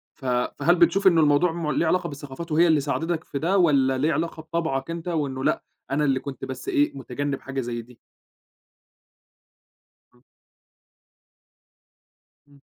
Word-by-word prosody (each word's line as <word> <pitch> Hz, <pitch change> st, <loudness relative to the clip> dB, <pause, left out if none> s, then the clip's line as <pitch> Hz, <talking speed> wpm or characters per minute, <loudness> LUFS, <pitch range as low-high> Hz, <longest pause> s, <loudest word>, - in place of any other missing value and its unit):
ف 135 Hz, -, -13 dB
فهل 125 Hz, +7 st, +1 dB
بتشوف 175 Hz, +3 st, +4 dB
إنه 170 Hz, -3 st, +5 dB
الموضوع 150 Hz, +3 st, +3 dB
م 165 Hz, -2 st, -2 dB
ليه 170 Hz, -, +1 dB
علاقة 180 Hz, +1 st, +1 dB
بالثقافات، 145 Hz, +3 st, -8 dB
وهي 170 Hz, +3 st, +4 dB
اللي 155 Hz, -2 st, +4 dB
ساعدتك 160 Hz, +4 st, -2 dB
في 140 Hz, -, -5 dB
ده، 180 Hz, +6 st, +1 dB
والّا 140 Hz, -7 st, +3 dB
ليه 150 Hz, +5 st, +1 dB
علاقة 160 Hz, +2 st, -3 dB
بطبعك 160 Hz, -3 st, -2 dB
أنت، 170 Hz, +1 st, -6 dB
وإنه 140 Hz, -6 st, -2 dB
لأ، -, -, +1 dB, 0.3 s
أنا 150 Hz, +2 st, +1 dB
اللي 135 Hz, -2 st, +2 dB
كنت 140 Hz, -1 st, -7 dB
بس 130 Hz, 0 st, -7 dB
إيه 145 Hz, -1 st, +1 dB
متجنب 140 Hz, +2 st, -3 dB
حاجة 135 Hz, 0 st, -4 dB
زَي 120 Hz, -1 st, -4 dB
دي؟ 120 Hz, +1 st, -18 dB, 2.2 s
إمم. 125 Hz, +1 st, -27 dB, 2.2 s
إمم. 140 Hz, -1 st, -21 dB
145 Hz, 150 wpm, -24 LUFS, 135-165 Hz, 2.2 s, إنه